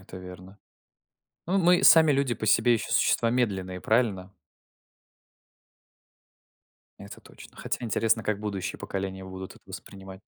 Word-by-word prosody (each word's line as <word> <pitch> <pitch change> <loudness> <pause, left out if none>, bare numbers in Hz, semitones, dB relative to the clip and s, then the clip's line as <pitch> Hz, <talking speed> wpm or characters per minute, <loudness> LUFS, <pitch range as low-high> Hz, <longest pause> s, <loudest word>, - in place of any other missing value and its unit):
это 95 0 -12
верно. 90 +2 -12 0.9
Ну, 190 +3 +1
мы 180 -1 +3
сами 160 -2 +7
люди 135 -3 0
по 110 - -6
себе 120 +3 +3
ещё 115 - -3
существа 115 - +2
медленные, 95 -7 -2
правильно? 100 -5 0 2.7
Это 100 0 -11
точно. - - -16
Хотя - - -4
интересно, 115 0 0
как 105 -1 -2
будущие 100 -3 -5
поколения 95 -1 -5
будут 95 0 -9
вот - - -21
воспринимать. 95 0 -11
100 Hz, 125 wpm, -26 LUFS, 95-120 Hz, 2.7 s, сами